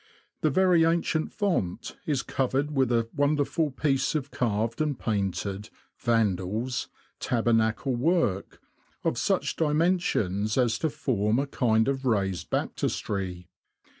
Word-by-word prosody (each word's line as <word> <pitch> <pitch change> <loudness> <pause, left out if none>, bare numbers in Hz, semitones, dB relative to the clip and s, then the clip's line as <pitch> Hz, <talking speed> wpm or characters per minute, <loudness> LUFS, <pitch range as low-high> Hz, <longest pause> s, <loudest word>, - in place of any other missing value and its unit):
The 155 - +3
very 180 +1 +4
ancient 165 -1 +1
font 170 - -2
is 145 -5 0
covered 135 +3 -1
with 135 -4 +1
a 115 -1 +2
wonderful 145 +2 +1
piece 135 +2 0
of 145 -2 -2
carved 115 +1 -1
and 150 -4 0
painted 100 -1 -2 0.3
(Vandals 110 +1 0 0.2
!) - - -38
tabernacle 115 +1 +1
work, 125 - 0 0.4
of - - 0
such - - 0
dimensions 150 - +1
as 120 -3 +2
to 160 - 0
form 110 -6 0
a 140 - +1
kind 110 -5 +2
of 135 -1 -1
raised 95 -8 0
baptistry. 90 -4 -2
125 Hz, 125 wpm, -27 LUFS, 105-150 Hz, 0.4 s, very